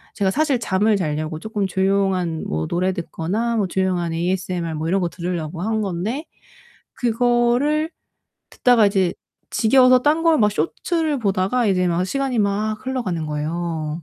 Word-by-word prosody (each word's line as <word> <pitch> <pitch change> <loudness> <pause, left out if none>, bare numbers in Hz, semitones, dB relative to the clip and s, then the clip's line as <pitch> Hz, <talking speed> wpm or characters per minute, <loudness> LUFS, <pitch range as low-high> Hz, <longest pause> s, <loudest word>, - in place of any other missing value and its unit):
제가 200 -3 +1
사실 285 -2 +1
잠을 210 0 +2
잘려고 155 -2 -3
조금 210 -1 -2
조용한 190 -3 0
뭐 80 +1 -2
노래 185 +2 0
듣거나 195 +7 -2
뭐 200 -3 +1
조용한 180 -3 -1
ASMR 175 -1 -2
뭐 155 +1 -3
이런 195 +1 +1
거 175 - 0
들으려고 170 -2 -4
한 220 +2 0
건데, 205 - -3 0.8
그거를 245 +6 +2 0.6
듣다가 245 -4 +4
이제 195 -3 +1 0.4
지겨워서 255 +2 +5
딴 305 +2 +2
걸 330 -3 +4
막 210 -1 +4
쇼츠를 310 - -1
보다가 205 +2 +1
이제 180 -2 +2
막 170 +1 0
시간이 265 +3 -1
막 210 +1 0
흘러가는 190 -12 -2
거예요. 155 +1 -3
195 Hz, 315 characters per minute, -21 LUFS, 170-240 Hz, 0.8 s, 지겨워서